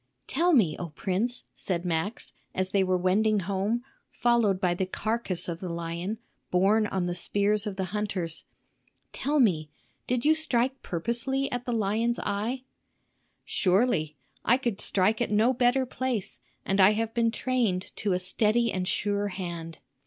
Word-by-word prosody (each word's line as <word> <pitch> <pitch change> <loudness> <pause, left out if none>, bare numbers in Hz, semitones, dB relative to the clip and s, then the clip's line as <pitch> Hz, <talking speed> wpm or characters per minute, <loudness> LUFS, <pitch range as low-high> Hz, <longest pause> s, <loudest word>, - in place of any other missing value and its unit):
"Tell 345 +6 +2
me, 200 - +4
O 175 - -4
prince," 195 +10 -1
said 175 -2 -3
Max, 175 +6 -2 0.2
as 185 0 -1
they 195 -1 +3
were 185 -1 +2
wending 205 +3 +2
home, 200 +6 -1 0.3
followed 235 -6 +2
by 180 -3 +2
the 185 +1 -2
carcass 205 -3 -1
of 170 -1 -4
the 185 - -5
lion, 170 +5 -3 0.3
borne 205 +4 +3
on 190 -3 -1
the 175 - -1
spears 205 +4 +1
of 200 - -4
the 190 - -2
hunters,—"tell 210 - -4
me, 165 - +2 0.4
did 250 +1 0
you 310 - +6
strike 265 -4 +1
purposely 235 +9 -1
at 245 0 -4
the - - 0
lion's 225 +2 +1
eye?" 220 +6 -2 0.8
"Surely; 185 -6 +1 0.3
I 240 - +4
could 235 -6 -2
strike 210 +4 +2
at 240 - +1
no 220 +5 +3
better 255 +1 +2
place, 250 -5 -3 0.2
and 195 +1 0
I 190 +3 +7
have 225 +1 -2
been 230 -1 +2
trained 225 -6 -1
to 200 -3 0
a - - +2
steady 215 +5 +1
and 185 -1 -2
sure 205 +1 0
hand." 170 -4 -6
205 Hz, 160 wpm, -27 LUFS, 185-235 Hz, 0.8 s, I